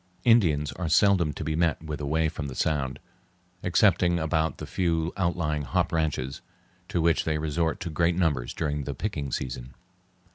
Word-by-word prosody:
Indians 85 Hz, -, +4 dB
are 90 Hz, -3 st, -4 dB
seldom 90 Hz, -2 st, +4 dB
to -, -, -5 dB
be 80 Hz, 0 st, -1 dB
met 80 Hz, -1 st, +1 dB
with 75 Hz, -2 st, -5 dB
away 80 Hz, +3 st, +1 dB
from 75 Hz, -2 st, -4 dB
the 65 Hz, -, -7 dB
Sound, 70 Hz, -3 st, 0 dB, 0.6 s
excepting 90 Hz, -1 st, +3 dB
about 80 Hz, 0 st, 0 dB
the -, -, -6 dB
few 85 Hz, -2 st, 0 dB
outlying 85 Hz, -5 st, 0 dB
hop 65 Hz, -, 0 dB
ranches, 75 Hz, -5 st, -1 dB, 0.5 s
to -, -, 0 dB
which 85 Hz, 0 st, +3 dB
they 80 Hz, -1 st, 0 dB
resort 80 Hz, +3 st, -1 dB
in 85 Hz, -, -4 dB
great 85 Hz, +2 st, +2 dB
numbers 75 Hz, -9 st, 0 dB
during 75 Hz, -3 st, -2 dB
the 70 Hz, -, -4 dB
picking 75 Hz, -6 st, -3 dB
season. 60 Hz, 0 st, -4 dB
80 Hz, 170 wpm, -27 LUFS, 75-85 Hz, 0.6 s, Indians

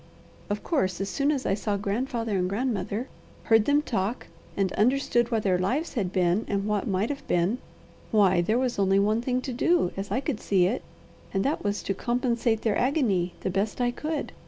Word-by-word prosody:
Of 205 Hz, 0 st, -2 dB
course, 190 Hz, -, 0 dB
as 195 Hz, 0 st, -2 dB
soon 280 Hz, +6 st, +1 dB
as 275 Hz, -4 st, -2 dB
I -, -, +2 dB
saw 205 Hz, 0 st, -1 dB
grandfather 225 Hz, +2 st, -2 dB
and 180 Hz, 0 st, 0 dB
grandmother, 215 Hz, +1 st, -2 dB, 0.4 s
heard 225 Hz, -2 st, +4 dB
them 290 Hz, +1 st, +3 dB
talk, 225 Hz, -2 st, -2 dB, 0.3 s
and 195 Hz, -2 st, +1 dB
understood 240 Hz, +1 st, +2 dB
what 225 Hz, -3 st, 0 dB
their 185 Hz, -2 st, +2 dB
lives 255 Hz, -, -1 dB
had 195 Hz, -8 st, -1 dB
been, 185 Hz, +2 st, +2 dB
and 200 Hz, -1 st, -1 dB
what 210 Hz, -2 st, -1 dB
might 195 Hz, +3 st, 0 dB
have 285 Hz, -1 st, -5 dB
been, 180 Hz, +8 st, +1 dB, 0.5 s
why 190 Hz, -5 st, +4 dB
there 215 Hz, +7 st, +1 dB
was 250 Hz, -4 st, -1 dB
only 195 Hz, 0 st, +3 dB
one 210 Hz, +3 st, +2 dB
thing 250 Hz, +1 st, 0 dB
to 255 Hz, -, -4 dB
do, 295 Hz, -, +2 dB
as 195 Hz, +1 st, -4 dB
I -, -, 0 dB
could 275 Hz, -5 st, -3 dB
see 185 Hz, -3 st, +2 dB
it, 215 Hz, +8 st, 0 dB, 0.5 s
and 195 Hz, -, +1 dB
that 290 Hz, +3 st, 0 dB
was 205 Hz, 0 st, -1 dB
to 195 Hz, -, -1 dB
compensate 235 Hz, 0 st, 0 dB
their 220 Hz, -3 st, +1 dB
agony 220 Hz, -, +1 dB
the 185 Hz, -, -1 dB
best 200 Hz, +5 st, -1 dB
I 245 Hz, -1 st, +2 dB
could. 305 Hz, +5 st, -3 dB
215 Hz, 205 wpm, -27 LUFS, 195-250 Hz, 0.5 s, heard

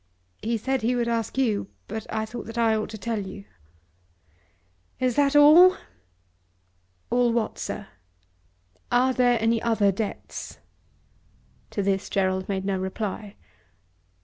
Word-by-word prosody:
"He 230 Hz, +1 st, -1 dB
said 265 Hz, +3 st, -1 dB
he 240 Hz, +3 st, +1 dB
would 240 Hz, -1 st, 0 dB
ask 230 Hz, +1 st, -2 dB
you. 225 Hz, -6 st, +1 dB, 0.2 s
But 220 Hz, -1 st, -6 dB
I 220 Hz, 0 st, -1 dB
thought 225 Hz, +1 st, -8 dB
that 225 Hz, +1 st, -8 dB
I 230 Hz, -1 st, +3 dB
ought 215 Hz, -, -2 dB
to 220 Hz, -, -7 dB
tell 225 Hz, +1 st, -3 dB
you." 200 Hz, 0 st, -8 dB, 1.5 s
"Is 250 Hz, -2 st, +1 dB
that 285 Hz, 0 st, +2 dB
all?" 320 Hz, +6 st, +8 dB, 1.3 s
"All 245 Hz, 0 st, +3 dB
what, 230 Hz, -1 st, -1 dB
sir?" -, -, -5 dB, 1.1 s
"Are 255 Hz, +2 st, +3 dB
there 245 Hz, -2 st, +3 dB, 0.2 s
other 220 Hz, -4 st, +2 dB
debts?" 205 Hz, +2 st, -6 dB, 1.1 s
To 200 Hz, -, -2 dB
this 195 Hz, 0 st, -1 dB
Gerald 190 Hz, -1 st, 0 dB
made 190 Hz, -1 st, -2 dB
no 195 Hz, -1 st, -1 dB
reply. 200 Hz, +2 st, -4 dB
225 Hz, 130 wpm, -25 LUFS, 200-245 Hz, 1.5 s, all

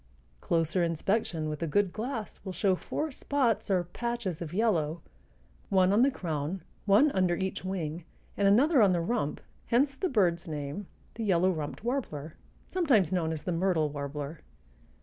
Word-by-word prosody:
Closer 165 Hz, -, +1 dB
inspection 165 Hz, -1 st, 0 dB
with 150 Hz, +1 st, -4 dB
a 165 Hz, -, 0 dB
good 195 Hz, +3 st, +1 dB
glass 225 Hz, 0 st, -5 dB
will 190 Hz, -, -5 dB
show 195 Hz, 0 st, +2 dB
four 305 Hz, -, -3 dB
spots 255 Hz, -6 st, 0 dB
or 185 Hz, -2 st, +2 dB
patches 210 Hz, -1 st, -4 dB
of 160 Hz, -3 st, -5 dB
yellow, 170 Hz, -6 st, +1 dB, 0.7 s
one 190 Hz, -1 st, +4 dB
on 215 Hz, -, +4 dB
the 270 Hz, -, +6 dB
crown, 170 Hz, -, -3 dB, 0.2 s
one 220 Hz, +10 st, +6 dB
under 185 Hz, -4 st, +2 dB
each 190 Hz, +1 st, -3 dB
wing, 175 Hz, -3 st, -3 dB, 0.3 s
and 200 Hz, -, +2 dB
another 260 Hz, +7 st, +5 dB
on 195 Hz, -3 st, +5 dB
the 175 Hz, -, +1 dB
rump, 170 Hz, -3 st, -1 dB, 0.3 s
hence 270 Hz, +4 st, +3 dB
the 370 Hz, +5 st, -1 dB
bird's 175 Hz, -7 st, +2 dB
name, 150 Hz, +5 st, -5 dB, 0.3 s
the 230 Hz, -, -5 dB
yellow 185 Hz, -2 st, +3 dB
rumped 155 Hz, +2 st, -5 dB
warbler, 165 Hz, -, -3 dB, 0.3 s
sometimes 260 Hz, -, +2 dB
known 170 Hz, -3 st, 0 dB
as 155 Hz, -2 st, -4 dB
the 180 Hz, -, -2 dB
myrtle 165 Hz, -3 st, +1 dB
warbler. 145 Hz, +1 st, -5 dB
185 Hz, 165 wpm, -29 LUFS, 160-220 Hz, 0.7 s, the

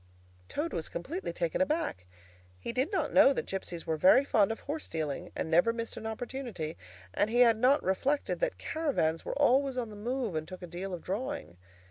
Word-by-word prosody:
Toad 320 Hz, +3 st, -2 dB
was 160 Hz, -, -3 dB
completely 290 Hz, -, -4 dB
taken 170 Hz, -, -1 dB
aback. 280 Hz, -, -1 dB, 0.5 s
He 160 Hz, -, -5 dB
did 260 Hz, +7 st, 0 dB
not 390 Hz, -, -1 dB
know 275 Hz, -, +7 dB
that -, -, -2 dB
gipsies 180 Hz, -3 st, -5 dB
were 160 Hz, -1 st, -1 dB
very 275 Hz, -, +6 dB
fond 215 Hz, -6 st, +3 dB
of 225 Hz, -, -5 dB
horse 300 Hz, +2 st, -4 dB
dealing, 155 Hz, -4 st, -3 dB
and -, -, -2 dB
never 175 Hz, +8 st, +5 dB
missed 230 Hz, 0 st, -5 dB
an 220 Hz, -, -5 dB
opportunity, 220 Hz, -, -5 dB, 0.4 s
and 205 Hz, -, +2 dB
he 240 Hz, +2 st, +3 dB
had 230 Hz, -2 st, +7 dB
not 260 Hz, +6 st, +4 dB
reflected 270 Hz, +10 st, 0 dB
that -, -, 0 dB
caravans 260 Hz, -, 0 dB
were -, -, -4 dB
always 275 Hz, -1 st, +3 dB
on 235 Hz, -3 st, -2 dB
the -, -, -9 dB
move 240 Hz, 0 st, -2 dB
and 155 Hz, 0 st, -3 dB
took 185 Hz, +1 st, -9 dB
a -, -, -3 dB
deal 180 Hz, +3 st, -6 dB
of 170 Hz, -, -11 dB
drawing. 215 Hz, -, -4 dB
230 Hz, 200 wpm, -31 LUFS, 175-275 Hz, 0.5 s, know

